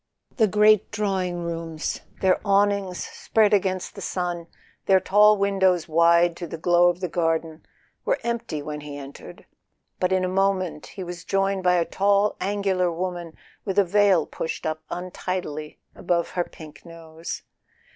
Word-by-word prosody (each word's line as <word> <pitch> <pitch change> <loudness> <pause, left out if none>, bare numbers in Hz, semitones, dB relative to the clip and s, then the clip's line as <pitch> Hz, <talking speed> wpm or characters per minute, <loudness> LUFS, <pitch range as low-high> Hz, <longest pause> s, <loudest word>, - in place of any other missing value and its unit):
The 220 -4 +4
great 210 0 +4
drawing 190 -5 -2
rooms, 165 -1 -4 0.2
their 190 -1 +3
awnings 200 -2 +1
spread 215 -2 +1
against 185 -2 0
the - - -9
sun, 175 -2 -3 0.4
their 190 -1 +6
tall 210 +2 +5
windows 190 -4 +2
wide 170 +1 +4
to 175 - -6
the 165 - -6
glow 175 +2 +4
of 175 +1 -3
the 180 - -1
garden, 165 -1 -1 0.4
were - - +1
empty 235 -11 -3
when 150 0 -6
he 145 -1 -8
entered; 140 0 -11 0.5
but 180 0 +1
in 185 -1 +2
a - - 0
mo¬ 195 +1 +2
ment 165 -5 -6
he 190 - -8
was 175 -1 -7
joined 195 0 0
by 180 -1 +3
a 170 -1 +2
tall 200 +2 +2
angular 195 -2 0
woman 175 -1 -4 0.3
with 195 -1 -3
a 200 - +5
veil 195 -3 +3
pushed 160 - -5
up 155 0 -2
untidily 175 -4 -5 0.2
above 170 -1 -1
her 175 -1 -1
pink 155 -2 -13
nose. 165 -1 -8
180 Hz, 160 wpm, -24 LUFS, 165-195 Hz, 0.5 s, their